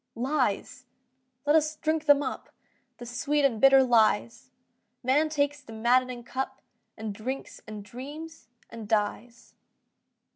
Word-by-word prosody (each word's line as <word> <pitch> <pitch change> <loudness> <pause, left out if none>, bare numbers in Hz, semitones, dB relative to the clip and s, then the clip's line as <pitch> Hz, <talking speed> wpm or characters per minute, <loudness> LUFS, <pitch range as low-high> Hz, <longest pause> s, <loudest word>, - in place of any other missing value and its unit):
Lies!—let 255 +2 -3
us 310 -1 +2
drink 315 0 -1
them 290 0 +6
up, 260 - -5 0.5
The 240 - -9
sweet 280 +4 0
and 230 -6 +1
bitter 270 0 +7
lies! 235 +1 +2 0.5
Man 290 +5 +2
takes 290 -1 0
the 225 -5 -12
maddening 245 +2 +1
cup 260 +3 -4 0.4
And 220 -2 -5
drinks 255 +6 -6
and 215 -1 -7
dreams 285 +4 -9 0.2
and 225 -2 -8
dies. 225 +3 -2
255 Hz, 120 wpm, -27 LUFS, 235-290 Hz, 0.5 s, bitter